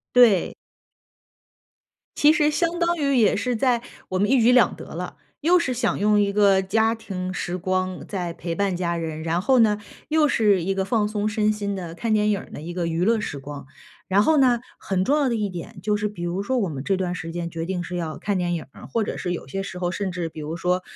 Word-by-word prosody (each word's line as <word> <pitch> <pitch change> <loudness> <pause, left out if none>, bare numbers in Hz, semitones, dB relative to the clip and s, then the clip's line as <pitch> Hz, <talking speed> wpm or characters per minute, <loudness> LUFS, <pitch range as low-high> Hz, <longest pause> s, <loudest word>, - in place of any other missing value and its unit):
对。 230 -8 +5 1.6
其 295 +1 +6
实 305 -2 +3
相 335 +2 0
当 345 0 +1
于 280 -4 +1
也 220 -5 +4
是 245 +4 -1
在 240 0 +2 0.3
我 185 - 0
们 205 +4 +2
一 265 -2 +5
举 235 +2 +5
两 250 - +5
得 - - -10
了， - - -5 0.2
又 345 +4 +4
是 310 -7 -1
想 240 -1 0
用 210 +1 +3
一 200 -1 +1
个 200 -2 +4
家 220 +4 +2
庭 190 -5 -5
时 180 -2 -3
光 185 0 -2
在 180 -4 -3
陪 170 0 -5
伴 195 0 0
家 170 -1 -1
人， 160 -2 -4
然 165 +2 0
后 255 +7 +3
呢， 210 -2 +4 0.3
又 310 0 +3
是 210 -9 +3
一 195 +3 -1
个 190 0 0
放 210 +1 +1
松 210 0 -1
身 215 0 +1
心 205 -1 -3
的 175 -3 -6
看 225 +6 -2
电 210 0 +3
影 200 -2 0
儿 - - -13
的 - - -8
一 170 +3 -7
个 175 -1 -1
娱 165 +2 0
乐 225 +2 +3
时 145 -8 -4
光， 140 0 -8 0.4
然 195 +1 +4
后 315 +7 +3
呢， 250 -3 +4 0.2
很 190 -1 -1
重 285 +8 +2
要 285 -3 +2
的 240 - 0
一 210 -2 -1
点 185 +3 -8
就 210 0 +1
是 210 0 -1
比 205 -4 -9
如 175 +3 -2
说 255 +5 0
我 200 -6 0
们 140 -4 -5
这 195 +6 +1
段 180 -1 -2
时 170 -2 -6
间 170 0 -4
决 165 0 -4
定 180 0 -2
是 180 +1 -5
要 165 -3 -4
看 205 -1 -1
电 175 -1 0
影 165 - -4
儿， - - -12
或 230 -2 -1
者 - - -4
是 180 - -3
有 175 - -5
些 195 0 -4
时 190 -2 -7
候 175 -1 -1
甚 195 0 -2
至 175 -2 -3
比 160 - -10
如 155 +2 -4
说 180 +2 0
195 Hz, 270 characters per minute, -24 LUFS, 175-225 Hz, 1.6 s, 其